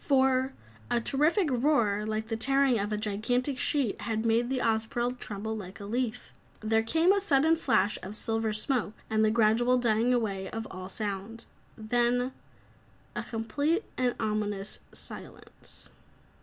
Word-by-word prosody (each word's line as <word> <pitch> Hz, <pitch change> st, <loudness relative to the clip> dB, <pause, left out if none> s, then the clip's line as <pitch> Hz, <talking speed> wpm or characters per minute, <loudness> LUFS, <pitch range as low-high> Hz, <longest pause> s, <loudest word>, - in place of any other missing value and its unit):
For 265 Hz, -2 st, +3 dB, 0.4 s
a -, -, +2 dB
terrific 305 Hz, -, +2 dB
roar 235 Hz, -6 st, +2 dB
like 220 Hz, +1 st, -2 dB
the 225 Hz, -, 0 dB
tearing 270 Hz, +1 st, +2 dB
of 205 Hz, +1 st, -2 dB
a 210 Hz, -, 0 dB
gigantic 245 Hz, +6 st, -1 dB
sheet 275 Hz, -8 st, +1 dB
had 220 Hz, -1 st, -1 dB
made 230 Hz, +2 st, +2 dB
the 265 Hz, -, 0 dB
Ozpril 240 Hz, +2 st, 0 dB
tremble 220 Hz, +1 st, -4 dB
like 195 Hz, -2 st, -8 dB
a 200 Hz, -, -7 dB
leaf. 240 Hz, +2 st, -3 dB, 0.3 s
There 220 Hz, +1 st, +2 dB
came 320 Hz, +11 st, +3 dB
a 400 Hz, -, +1 dB
sudden 320 Hz, -3 st, +4 dB
flash 205 Hz, -10 st, +1 dB
of 195 Hz, +3 st, -6 dB
silver 225 Hz, 0 st, 0 dB
smoke, 215 Hz, 0 st, -1 dB, 0.2 s
and 220 Hz, 0 st, +3 dB
the 215 Hz, -, +4 dB
gradual 230 Hz, +3 st, +3 dB
dying 235 Hz, 0 st, +2 dB
away 200 Hz, -6 st, 0 dB
of 225 Hz, 0 st, -5 dB
all 185 Hz, 0 st, -7 dB
sound. 205 Hz, +2 st, -4 dB, 0.3 s
Then 240 Hz, +3 st, +1 dB, 0.8 s
a -, -, -1 dB
complete 285 Hz, -, -1 dB
and 250 Hz, -1 st, +1 dB
ominous 210 Hz, -2 st, -1 dB
silence. -, -, -7 dB
225 Hz, 150 wpm, -29 LUFS, 215-255 Hz, 0.8 s, sudden